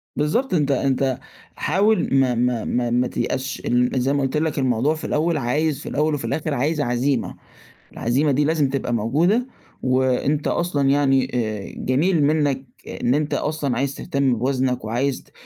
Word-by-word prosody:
بالضبط، 210 - 0
أنت 150 -5 +2
أنت 135 -1 0 0.4
حاول 205 +7 +1
ما 135 -2 +3
ما 120 -1 0
ما 120 -1 0
ما 125 +1 +1
تيأسش 130 +1 -3
أن 125 0 +2
زي 135 +3 +1
ما 140 - +1
قُلت 135 +2 -1
لك 155 -2 -1
الموضوع 130 +3 +1
في 155 - -6
الأول 160 +1 +1
عايز 145 +3 0
في - - -7
الأول 150 +2 0
وفي 145 - -3
الآخر 155 -1 -2
عايز 150 +4 0
عزيمة، 125 +1 0 0.6
العزيمة 135 +6 +1
دي 145 +3 +2
لازم 155 -2 +2
تبقى 135 -2 -2
موجودة 160 - +1 0.4
وأنت 130 +3 +1
أصلًا 145 -6 0
يعني 135 -2 +2
آآ، 110 -4 -3
جميل 155 +6 +1
منّك 145 -3 +1 0.2
إن 125 - -1
أنت 150 0 0
أصلًا 145 -5 -1
عايز 135 +2 -1
تهتم 140 -3 0
بوزنك 130 -1 0
وعايز 125 +5 -1
ت - - -27
140 Hz, 165 wpm, -22 LUFS, 125-150 Hz, 0.6 s, ما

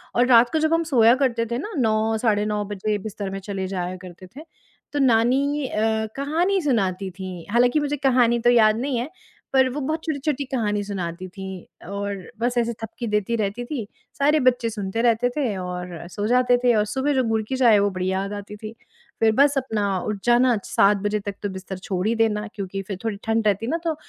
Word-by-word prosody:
और 245 +1 +4
रात 240 -1 +6
को 315 - +2
जब 315 +1 +1
हम 330 0 +2
सोया 245 -7 +5
करते 235 -3 +1
थे 235 - 0
ना, 420 - -5
9, 220 -2 +1
साढ़े 210 -3 +1
9 210 -1 -1
बजे 205 +1 -2
बिस्तर 205 -2 -5
में 195 - -4
चले 195 -1 -4
जाया 185 -1 -3
करते 185 0 -11
थे, 305 - -8 0.5
तो 290 - 0
नानी 270 +4 +2
अ, 220 -1 0
कहानी 340 +8 +1
सुनाती 195 - 0
थीं। 185 -3 -6
हालाँकि 245 +5 +3
मुझे 295 0 -1
कहानी 250 -4 +3
तो 240 +1 +3
याद 220 -2 +5
नहीं 265 0 -1
है, 250 +5 -3 0.4
पर 265 -1 +5
वो 270 +4 -4
बहुत 315 +4 -2
छोटी-छोटी 290 -2 -2
कहानी 215 -6 -1
सुनाती 185 -3 -5
थीं, 190 -2 -10
और 200 -1 -5
बस 245 +1 0
ऐसे 235 0 +1
थपकी 235 +1 -5
देती 210 +2 0
रहती 215 +2 -2
थीं, 245 -4 -4 0.3
सारे 295 +2 +4
बच्चे 245 -2 +2
सुनते 210 0 -3
रहते 235 0 +2
थे 250 -8 0
और 180 -2 -6
सो 205 +4 -3
जाते 250 +1 +4
थे, 245 -1 +5
और 210 -1 +2
सुबह 265 +7 -1
जो 260 -2 +2
गुड़ 220 0 +1
की 265 - -1
चाय 245 -4 +5
है, 205 - +6
वो 200 0 +2
बढ़िया 185 +1 -1
आ - - -4
जाती 205 0 -7
थी। 215 +1 -8 0.5
फिर 225 -1 +4
बस 280 +2 +4
अपना 210 -7 -1
उठ 210 -1 -2
जाना, 240 +1 +4
7 200 +1 +3
बजे 210 +1 0
तक 200 0 -6
तो 205 - -1
बिस्तर 190 0 -7
छोड़ 185 0 -3
ही 225 - +2
देना, 215 -2 +1
क्योंकि 195 -1 -4
फिर 195 -3 -4
थोड़ी 215 -3 -2
ठंड 225 -1 +1
रहती 205 +2 +1
ना, 325 - 0
तो 325 -2 0
225 Hz, 215 wpm, -23 LUFS, 200-255 Hz, 0.5 s, रात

